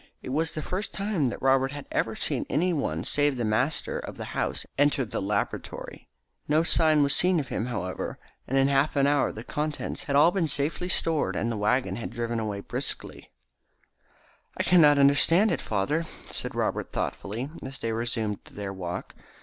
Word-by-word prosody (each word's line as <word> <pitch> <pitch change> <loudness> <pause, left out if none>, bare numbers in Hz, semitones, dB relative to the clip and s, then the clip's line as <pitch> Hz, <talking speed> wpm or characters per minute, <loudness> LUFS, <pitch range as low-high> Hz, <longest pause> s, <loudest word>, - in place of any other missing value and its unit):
It - - -6
was 160 +4 0
the 155 - -4
first 190 +4 -3
time 195 - 0
that - - -7
Robert 135 0 +4
had 145 -1 -7
ever - - 0
seen - - -1
any 175 +5 +2
one 80 - -1
save 145 -2 +1
the 120 - -1
master 120 +8 0
of - - -8
the - - -6
house - - -1
enter 145 -2 +3
the 105 - -4
laboratory. 100 +1 -3 0.4
No 155 +2 +3
sign 155 -3 +4
was 140 - +2
seen 180 -1 +3
of 140 - -4
him 110 - -2
now, - - -5
however, 95 -3 -4 0.3
and 135 - 0
in 135 0 +5
half 140 +2 +2
an 140 -1 +4
hour 145 0 +3
the 110 - -8
contents 150 +3 -3
had 140 - -1
all 150 +4 +7
been 180 -4 +1
safely 150 +5 0
stored 165 -4 +1
and 115 - 0
the - - -2
waggon 125 +5 +1
had 115 - -4
driven 120 0 -2 0.2
briskly - - -3
away. - - -16 1.3
"I - - +1
cannot 150 -5 +6
understand 145 +9 +5
it, - - -1
father," 145 +11 -1 0.2
said - - -5
Robert - - -1
thoughtfully, 115 +8 -3
as 135 +1 -7
they 115 -1 -2
resumed 110 -2 -2
their 100 -1 -6
walk. 90 -2 -5
140 Hz, 190 wpm, -27 LUFS, 115-155 Hz, 1.3 s, all